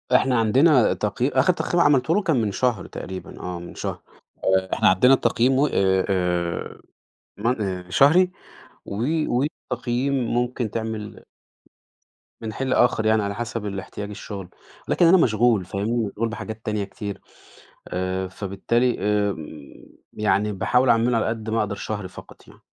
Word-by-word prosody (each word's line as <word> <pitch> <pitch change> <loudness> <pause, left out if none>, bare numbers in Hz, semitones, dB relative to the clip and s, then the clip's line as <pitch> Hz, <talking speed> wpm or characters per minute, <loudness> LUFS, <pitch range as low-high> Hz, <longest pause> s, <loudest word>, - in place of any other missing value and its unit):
إحنا 125 -1 +3
عندنا 130 +4 +4
تقيي 105 +6 -1
آخر 135 +7 +3
تقييم 175 0 -1
عملته 145 +3 +3
له 210 - +2
كان 165 -9 +1
من 105 - -1
شهر 125 +3 0
تقريبًا، 95 0 -8
آه 90 -1 -5
من 85 - -10
شهر، - - -4 0.6
آآ 95 0 -1
إحنا - - +3
عندنا 125 +8 +5
التقييم 130 -1 +2
و 145 - +4
آآ 95 -4 +2
آآ 90 -3 -1 0.6
من 115 +2 0
آآ 90 -2 -4
شهري 170 - +5 0.5
و - - -7 0.3
والتقييم 125 -1 -2
ممكن 120 -2 -1
تعمل 110 -2 -5 1.2
من 110 -1 -5
حين 135 +4 -3
لآخر 120 -3 +2
يعني 110 -1 +3
على 100 0 -3
حسب 115 -1 -4
الإحتياج 100 +1 -6
الشغل، 100 -3 -8 0.4
لكن 175 - +3
أنا 185 +3 +7
مشغول 110 - +3
فاهمني؟ 110 +4 -1
مشغول 115 +3 -3
بحاجات 110 -1 -7
تانية 105 -1 -1
كتير، 100 0 -7 0.7
آآ 95 +1 -2
فبالتالي 100 +6 -1
آمم، 95 -8 -3 0.3
يعني 105 0 +1
باحاول 125 +6 +2
أعمله 115 +1 +3
على - - 0
قد 110 -1 -3
ما 115 - 0
أقدر 105 -1 -1
شهري 105 -1 -5
فقط - - -14
يعني. - - -17
110 Hz, 150 wpm, -23 LUFS, 100-125 Hz, 1.2 s, أنا